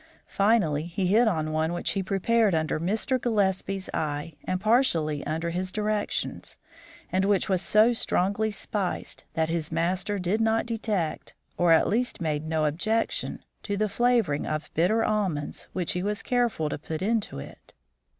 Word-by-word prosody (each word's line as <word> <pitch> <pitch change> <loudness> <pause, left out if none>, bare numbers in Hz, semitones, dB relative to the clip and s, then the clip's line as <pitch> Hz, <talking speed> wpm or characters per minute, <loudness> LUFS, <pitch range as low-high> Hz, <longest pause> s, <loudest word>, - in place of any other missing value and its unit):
Finally 185 -8 +2
he 185 +2 -2
hit 220 +6 +4
on 155 -6 0
one 160 +2 0
which 175 - -1
he 195 - -1
prepared 200 +1 +2
under 155 0 0
Mr. 220 - 0
Gillespie's 195 -4 0
eye 150 +1 -2
and 185 - -1
partially 175 - +2
under 165 +2 -2
his 185 +2 -2
directions, 210 +1 -2 0.5
and 185 +2 +2
which 200 0 +2
was 190 -3 +1
so 215 +4 +4
strongly 210 0 0
spiced 205 -2 -4
that 160 -1 +1
his 165 -2 -2
master 180 +5 0
did 190 +4 0
not 225 0 +2
detect, 215 -8 -2 0.2
or 175 -1 +3
at 165 - +6
least 240 +4 0
made 155 -2 -2
no 155 -1 +1
objection, 215 +10 -1 0.2
to 205 -1 -3
the 215 +1 +1
flavouring 225 -8 +1
of 155 0 -3
bitter 215 +8 +2
almonds 190 -9 -1
which 180 -3 -2
he 180 - -2
was 205 +2 -2
careful 240 -10 +1
to 150 - -4
put 160 +3 -5
into 220 - 0
it. 70 - -11
190 Hz, 160 wpm, -27 LUFS, 160-215 Hz, 0.5 s, at